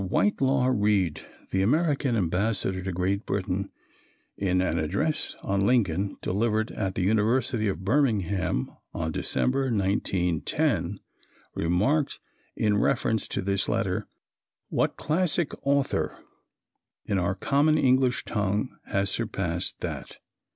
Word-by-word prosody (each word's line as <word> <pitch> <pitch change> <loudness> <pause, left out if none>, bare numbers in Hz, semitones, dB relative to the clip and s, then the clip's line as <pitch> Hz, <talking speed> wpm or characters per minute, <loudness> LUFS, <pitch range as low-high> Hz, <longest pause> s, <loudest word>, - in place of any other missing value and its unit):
Whitelaw 135 - +2
Reid, 100 -7 +1 0.3
the 95 - +1
American 140 - +2
Ambassador 95 0 0
to 95 +1 -3
Great 95 +4 -1
Britain, 100 0 -2 0.7
in 95 -2 +1
an 90 -3 +1
address 150 - -1
on 100 0 +1
Lincoln 100 -5 +1
delivered 110 +3 0
at 95 -3 -3
the 95 - 0
University 110 +3 +2
of 95 -1 -3
Birmingham 100 - +1 0.2
in 80 -1 -2
December, 135 - +1
1910, 95 - 0 0.5
remarked 105 - +1 0.4
in 105 -1 +2
reference 110 -4 +1
to - - -3
this 100 0 0
letter, - - -1 0.6
"What - - 0
classic 165 -1 +1
author 140 0 0 0.9
in 100 -3 0
our 90 +1 0
common 145 +9 +2
English 130 -2 +3
tongue 105 +2 -1
has 100 0 0
surpassed 95 -7 -1
that?" - - -5
105 Hz, 115 wpm, -27 LUFS, 95-130 Hz, 0.9 s, English